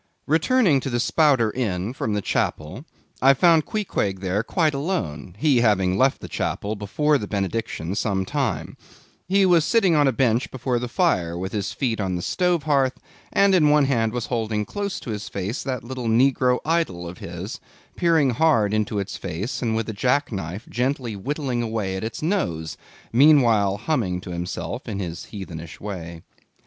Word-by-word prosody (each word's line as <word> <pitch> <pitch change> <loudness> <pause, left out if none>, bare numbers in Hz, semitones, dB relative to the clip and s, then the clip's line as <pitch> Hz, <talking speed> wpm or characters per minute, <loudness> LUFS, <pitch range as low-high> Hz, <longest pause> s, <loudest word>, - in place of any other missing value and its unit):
Returning 165 - +3
to 135 - -4
the 120 -1 -1
Spouter 135 -4 +3
Inn 105 -3 -2
from 110 -4 -2
the 105 - -2
Chapel, 80 - -2 0.4
I 135 +1 +6
found 165 +1 +4
Queequeg 105 - -2
there 95 +2 0
quite 155 +4 +1
alone; 95 - -3
he 140 +2 +3
having 95 -5 +2
left 130 +6 +2
the - - -7
Chapel 105 +2 -3
before 145 +9 +1
the 105 - -5
benediction 100 -4 -3
some 100 -2 -1
time. - - -2 0.5
He 195 +2 +4
was 175 -3 +5
sitting 195 -2 +3
on 145 -2 +4
a - - +4
bench 120 -1 +1
before 125 -1 -2
the 125 - -3
fire, 90 - +1
with 95 +1 -4
his 105 -3 -2
feet 115 -6 -1
on 95 -2 -1
the 90 - -4
stove 180 -4 +1
hearth, 135 -4 +1 0.3
and 200 0 +4
in 155 -5 +5
one 150 -1 +5
hand 115 -5 +1
was 120 -1 -3
holding 110 -3 -1
close 200 - -4
up - - -9
to 115 - -5
his 105 -1 -5
face 100 +6 -3
that 130 -3 -3
little 125 0 -5
negro 125 +2 +3
idol 155 - 0
of 85 +1 -9
his; 90 +6 -6 0.4
peering 165 -6 +3
hard 115 -6 +2
into 110 0 0
its 100 -1 -3
face, 95 +10 -4
and 115 -3 0
with 115 -1 -1
a 110 - -4
jack 125 +7 +1
knife 95 +2 -5
gently 125 -2 -2
whittling 130 +3 -2
away 110 -5 -2
at 95 - -4
its 110 +6 -5
nose, 85 - -1 0.4
meanwhile 115 -8 +5
humming 105 - -1
to 90 - -8
himself 90 +9 -5
in 105 -4 -4
his 85 -4 -5
heathenish 85 -6 -8
way. 85 -5 -7
115 Hz, 180 wpm, -23 LUFS, 100-145 Hz, 0.5 s, I